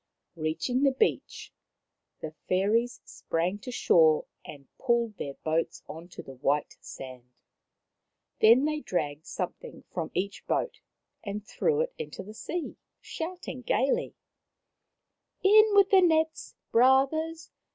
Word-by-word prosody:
Reaching 165 +11 -1
the 280 - +5
beach, 440 - -1 0.7
the 155 - -5 0.2
fairies 220 +7 +1
sprang 175 +5 -2
to 250 - -7
shore 160 -9 +4 0.2
and 140 -2 -11
pulled 235 -4 0
their 140 -1 -5
boats 160 +1 -1
on 165 +2 -9
to 175 - -10
the 135 - -10
white 140 +3 -1
sand. 130 -2 -10 1.1
Then 235 +6 +6
they 305 0 -1
dragged 155 - -3
something 180 - -6
from 165 -3 -3
each 200 +2 -3
boat - - -1 0.4
and 205 0 -5
threw 460 - 0
it - - -2
into 460 - -6
the 210 +3 -11
sea, 335 +9 -5 0.2
shouting 325 -6 -6
gaily: 265 +2 0 0.7
" - - -51
In 425 +2 +7
with 400 -1 +5
the 385 -1 +7
nets, 320 -2 +1 0.2
brothers 275 +7 +2
230 Hz, 130 wpm, -28 LUFS, -, 1.1 s, In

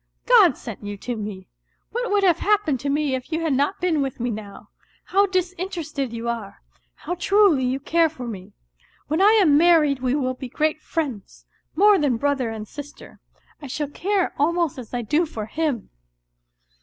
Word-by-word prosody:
" - - -49
God 350 - +5
sent 220 -3 -9
you 205 0 -5
to 245 +4 -4
me. 205 -3 -7 0.4
What 485 +1 -2
would 405 -1 +2
have 350 -4 +4
hap 420 0 +2
pened 280 -5 0
to 280 - -3
me 290 -1 0
if 260 +4 -4
you 320 +1 -1
had 320 -3 0
not 285 +8 0
been 340 -5 +1
with 270 -2 -3
me 240 +1 -1
now? 205 -2 -9 0.3
How 400 +2 +2
disin 370 -1 -2
terested 300 - -4
you 230 0 -5
are! 225 -4 -5 0.3
How - - -5
truly 360 -6 +3
you 255 +2 -1
care 330 +3 +2
for 260 -5 -8
me! 195 -5 -8 0.6
When 315 +4 +1
I 415 +2 +6
am 300 -7 +5
married 315 -5 +4
we 255 +1 0
will 255 -3 0
be 255 0 -8
great 310 +3 -1
friends, 275 - -5 0.3
more_jjian 355 - +4
brother 275 -2 0
and 220 -1 -6
sister; 290 +3 -11 0.4
I 285 - -7
sKalTcare 330 +8 -1
almost 330 -1 +1
as 240 - -10
I 245 -1 -3
do 305 +9 +1
for 220 -7 -6
him. 280 -1 -3
290 Hz, 190 wpm, -23 LUFS, 245-345 Hz, 0.6 s, I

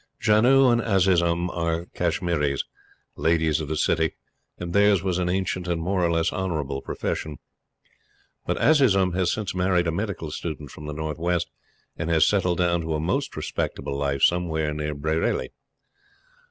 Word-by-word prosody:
Janoo 125 +5 +5
and 120 0 +2
Azizun 90 -4 +2
are 85 0 -1
Kashmiris, 85 -5 0 0.5
Ladies 80 -1 +1
of 75 - -5
the 80 +1 -2
City, 80 +1 +1 0.4
and 85 -1 -5
theirs 100 -3 +4
was 90 -2 0
an 90 -1 0
ancient 90 -1 -1
and 85 -1 -1
more 90 +2 0
or 85 - +2
less 85 0 +1
honorable 80 -8 -2
profession; 75 +2 -4 1.1
but - - 0
Azizun 100 - +4
has 90 0 +1
since 105 -4 -3
married 90 -1 +1
a 80 - 0
medical 95 -4 -4
student 75 -3 -6
from 75 - -9
the 75 - -4
North 80 0 -4
West 85 0 -1 0.5
and 80 - -3
has 80 -2 +4
settled 90 -4 +1
down 85 -1 +1
to 80 -1 -2
a - - -1
most 85 +4 -2
respectable 70 - -3
life 70 -1 -1
somewhere 80 -3 +2
near 75 0 -3
Bareilly. 80 +3 -1
85 Hz, 160 wpm, -24 LUFS, 80-95 Hz, 1.1 s, Janoo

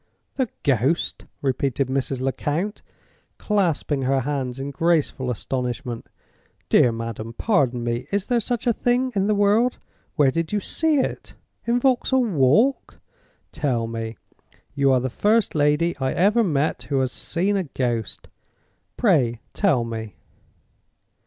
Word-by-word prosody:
"The 260 -4 -1
Ghost?" 135 +4 0 0.2
repeated 135 0 0
Mrs. 130 0 -2
Lecount, 150 +9 -2 0.6
clasping 170 -8 0
her 135 +1 +1
hands 130 -2 -3
in 140 +1 -4
graceful 150 -4 +1
astonishment. 125 0 -3 0.6
"Dear 120 - +5
madam, 115 0 -5
pardon 130 - +1
me! 120 +2 -2
Is 200 -1 0
there 245 -2 +1
such 240 +2 -2
a 240 - +3
thing 250 +3 +1
in 195 0 +1
the 215 - +2
world? 210 +5 +3 0.4
Where 140 -3 +4
did 165 +3 -2
you 210 - +1
see 315 +9 +1
it? 265 - -2 0.3
In 240 +1 +2
Vauxhall 260 0 +2
Walk? 205 - +2 0.5
Tell 125 -6 -1
me—you 115 +4 -4
are 130 - +4
the 130 0 -3
first 215 - +2
lady 150 +3 +2
I 130 -1 0
ever 210 +6 +3
met 150 -6 +1
with - - -18
who 140 -2 +1
has 130 -1 -1
seen 190 +9 -1
a 190 -2 0
ghost—pray 125 - -2
tell 160 - +2
me!" 110 -2 -6
145 Hz, 135 wpm, -23 LUFS, 125-205 Hz, 0.6 s, Dear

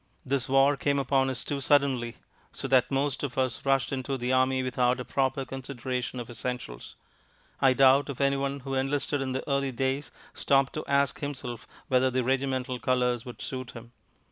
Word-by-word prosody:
This 135 -1 0
war 135 +2 +5
came 140 +1 +1
upon 135 0 +2
us 130 -2 -3
too 140 -1 -3
suddenly, 135 -5 +2 0.3
so - - -5
that 130 -2 +4
most 135 0 0
of 140 -4 -4
us 130 -2 0
rushed 135 -1 +1
into 135 +1 -2
the 125 +1 -1
army 130 0 +2
without 125 0 +1
a 125 - -5
proper 135 0 0
consideration 125 -1 -4
of 120 - -6
essentials. 120 - -6 0.7
I 135 -2 +6
doubt 135 +2 +5
if 140 - -5
anyone 140 0 0
who 135 +1 -5
enlisted 135 +1 0
in 130 -1 -2
the 130 - -4
early 140 -1 0
days 135 +3 -1 0.2
stopped 135 -1 +2
to 155 - -4
ask 140 0 +1
himself 130 -5 -5 0.2
whether 130 0 +3
the 130 0 0
regimental 130 0 -1
colours 125 -2 +1
would 125 - -8
suit 130 -2 -5
him. 115 0 -11
130 Hz, 180 wpm, -28 LUFS, 125-140 Hz, 0.7 s, I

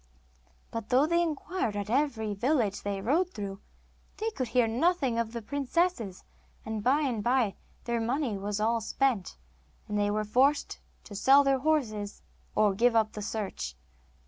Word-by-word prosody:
But 230 -2 -5
though 260 +3 +4
they 340 +2 +2
inquired 325 - -2
at 205 -1 -3
every 230 -4 0
village 225 -2 0
they 200 -1 -3
rode 320 - +2
through, 200 -1 -5 0.6
they 445 +1 -2
could 255 - -3
hear 235 0 +3
nothing 265 0 +1
of 230 -1 -1
the 235 -1 -6
princesses, 280 - -1 0.4
and 220 -1 -4
by 275 +6 +3
and 245 -8 -1
by 240 -4 +2 0.3
their 235 -1 -1
money 245 0 -1
was 200 +1 -3
all 225 +2 +1
spent, 245 -4 0 0.5
and 210 -1 -1
they 205 0 +2
were 215 +1 0
forced 270 +7 +2 0.2
to 210 - -11
sell 270 +8 +6
their 275 -1 +2
horses, 235 -9 -1 0.3
or 210 -2 +4
give 235 +4 +3
up 220 -1 +3
the 210 - -7
search. 200 - -4
230 Hz, 165 wpm, -29 LUFS, 210-275 Hz, 0.6 s, sell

